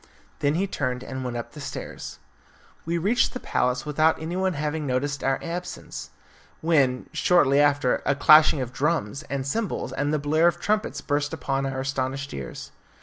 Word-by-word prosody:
Then 145 +1 +1
he 190 +4 +1
turned 125 -9 -2
and 130 0 -5
went 125 -1 -3
up 120 - -6
the 150 - -10
stairs. - - -7 0.7
We 170 +1 0
reached 205 +9 +2
the 255 - -4
palace 125 - 0
without 155 +2 +2
anyone 180 +4 -1
having 150 0 -2
noticed 140 +2 -1
our 135 0 +2
absence, 175 +1 -6 0.5
when, 140 -6 +2
shortly 145 -6 +4
after, 145 -3 +3
a 140 - +1
clashing 155 0 +6
of 125 0 -5
drums, 140 -5 -1
and 135 -1 -2
cymbals, 210 +8 -2
and 145 +1 -1
the 155 - +2
blare 155 +3 +3
of 175 0 +1
trumpets 210 +3 -1
burst 145 +1 -1
upon 135 -2 -1
our 130 0 -3
astonished 135 +1 -3
ears. 65 -2 -7
145 Hz, 170 wpm, -25 LUFS, 135-160 Hz, 0.7 s, clashing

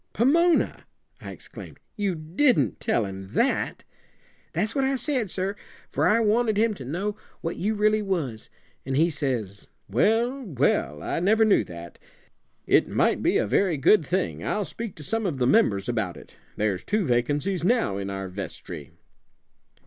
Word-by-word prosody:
"Pomona!" 330 - +2 0.3
I - - -8
exclaimed. - - -11 0.2
"You 200 -5 -1
didn't 160 - +1
tell 115 - +1
him 95 +1 -8
that?" 250 - +1 0.7
"That's 215 +1 -1
what 275 - +1
I 270 0 +1
said, 255 -5 -1
sir, 190 +3 -2 0.4
for - - +2
I 225 - +4
wanted 220 0 +2
him 225 +1 +3
to 135 -10 -9
know 190 +10 -2 0.3
what 165 - -3
you 215 +4 -1
really 215 +1 +2
was; 160 - -3 0.3
an' 135 0 -3
he 165 +4 +3
says, 120 -10 -3 0.2
'Well, 225 - +1
well, 125 - 0
I - - -1
never 220 +5 +4
knew 205 - +4
that. 85 -1 -10 0.7
It - - +4
might - - +1
be - - +2
a - - +1
very 170 - +2
good 165 +7 +5
thing. 185 +6 -2
I'll 210 -1 -1
speak 200 +7 -6
to 150 - -10
some 225 +6 -1
of 155 -7 -2
the 125 - +1
members 100 -6 +3
about 110 -7 -2
it. - - -15 0.2
There's 100 -3 0
two 210 -2 0
vacancies 145 +9 0
now 225 - +2
in 100 0 -4
our 95 -1 -4
vestry.'" 90 -5 -7
175 Hz, 165 wpm, -25 LUFS, -, 0.7 s, good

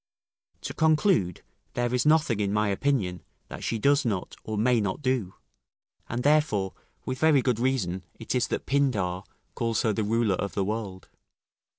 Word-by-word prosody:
To - - -5
conclude; 155 - +2 0.3
there 120 0 0
is 125 +4 +1
nothing, 155 -8 +3
in 100 -1 0
my 105 0 +1
opinion, 100 - 0 0.3
that - - -8
she 115 - -1
does 140 +6 +3
not, 100 -7 -2
or 110 -1 -4
may 120 +2 +3
not 100 +8 -3
do; 130 -8 -1 0.7
and 120 +1 -2
therefore, 145 -11 +2 0.3
with 130 0 -3
very 150 -4 +4
good 125 -4 +1
reason 105 -8 0
it 115 - -4
is 125 -2 +1
that - - -3
Pindar 105 -10 0 0.3
calls 115 -1 -1
her 110 - +2
the 110 - -1
ruler 110 -2 +1
of 100 - -4
the 100 - 0
world. 100 -3 -4
115 Hz, 170 wpm, -27 LUFS, 100-130 Hz, 0.7 s, very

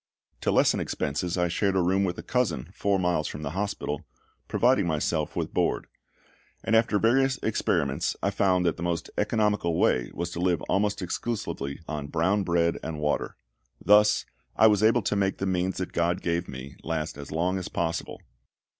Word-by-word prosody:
To - - 0
lessen - - +3
expenses 80 +5 -2
I 90 0 +2
shared 95 +3 0
a - - +3
room 95 +2 +2
with 90 -2 -2
a - - -7
cousin, 120 - -1
four 100 -1 +1
miles 90 -4 0
from 75 - -6
the 70 - -3
hospital, 90 -5 -3 0.4
providing 120 -6 +3
myself 80 -1 -1
with - - -3
board; - - 0 0.8
and 115 - +2
after 110 -2 +3
various 130 +5 +3
experiments 80 -10 0
I 100 - +2
found 95 -2 +2
that 85 - +1
the - - -8
most 85 -1 -2
economical 105 -5 +1
way 60 - +2
was 85 +1 -3
to 85 - -5
live 90 -1 +1
almost 100 0 0
exclusively 90 -7 -4
on 75 -2 -4
brown 85 +7 +1
bread 85 -2 +1
and 80 -2 -5
water. 75 0 -1 0.4
Thus 105 +1 +4 0.3
I - - +5
was 105 -2 +5
able 115 +1 +4
to 105 - 0
make 95 -1 +1
the 95 - -2
means 95 0 0
that 95 - -4
GOD 85 +1 0
gave 85 +1 -1
me 65 +1 -9
last 80 -1 -3
as 70 0 -9
long 90 +4 0
as 90 - -5
possible. 85 -1 -3
90 Hz, 180 wpm, -27 LUFS, 80-100 Hz, 0.8 s, I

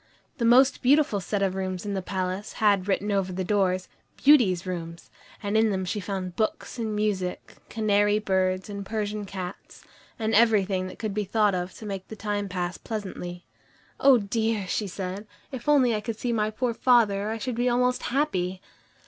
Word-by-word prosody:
The 235 - +1
most 255 +4 +5
beautiful 275 -5 +3
set 200 +1 -2
of 190 -1 +1
rooms 185 0 -3
in 205 - -2
the 190 - -1
palace 185 +2 -3
had 200 -3 +2
written 205 +1 0
over 195 -2 0
the 185 +1 -3
doors, 185 -2 +1 0.3
"Beauty's 225 - +5
Rooms," 170 -2 -6 0.3
and 205 +1 -1
in 220 0 +4
them 190 -2 -1
she 205 +4 -2
found 185 -2 -4
books 220 +3 -2
and 220 -2 -2
music, 200 -4 -2
canary 205 -1 +2
birds 190 -2 0
and 200 -1 -6
Persian 210 0 -3
cats, 185 -1 -8 0.3
and 220 -1 -1
everything 200 -4 +3
that 185 - -10
could 215 -3 -3
be 210 +1 -1
thought 210 +1 +2
of 180 0 -3
to 220 - -10
make 195 -2 -5
the 220 - -8
time 205 -1 -3
pass 180 -1 -3
pleasantly. 185 -5 -6 0.5
"Oh, 270 -2 +7
dear!" 220 0 -1
she 210 +2 -1
said; 190 +2 -5 0.2
"if 260 +1 -4
only 260 -5 +5
I 210 - -1
could 220 0 -4
see 240 0 -1
my 215 -1 +1
poor 235 +2 -1
father 215 -5 +3
I 225 - -2
should 250 +2 -3
be 240 +2 +1
almost 250 +1 +1
happy." 190 -10 -1
205 Hz, 185 wpm, -26 LUFS, 185-225 Hz, 0.5 s, Oh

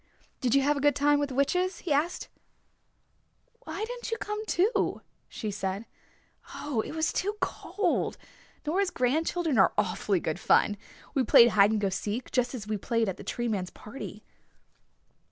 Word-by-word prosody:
"Did 250 0 +1
you 275 - +4
have 290 +1 +2
a - - -2
good 290 0 +4
time 290 0 +3
with 290 -1 -1
the 260 - -6
witches?" 360 +7 +1
he 315 - +2
asked. 310 +5 0 1.4
"Why 420 - -3
didn't 485 +1 -6
you 455 - -1
come, 420 0 -4
too?" 405 +6 +1 0.3
she 215 -3 -4
said 195 +2 -3 0.7
"Oh, 280 -7 -1
it - - -7
was 320 0 0
too 410 +2 -1
cold. 415 - -1 0.5
Nora's 365 +5 +1
grandchildren 310 - +1
are 195 - +5
awfully 205 -2 +1
good 160 +1 -3
fun. 205 - +3 0.4
We 270 - +2
played 235 0 +7
hide 205 -2 +5
and 220 -1 +1
go 200 -1 +1
seek, 210 +6 -3
just 250 0 0
as 220 -5 -6
we 215 0 -2
played 230 +3 0
it 215 - +1
at 190 - -4
the - - -9
Tree 240 0 -3
Man's 195 -5 -2
party." 210 +8 -9
265 Hz, 175 wpm, -28 LUFS, 215-325 Hz, 1.4 s, played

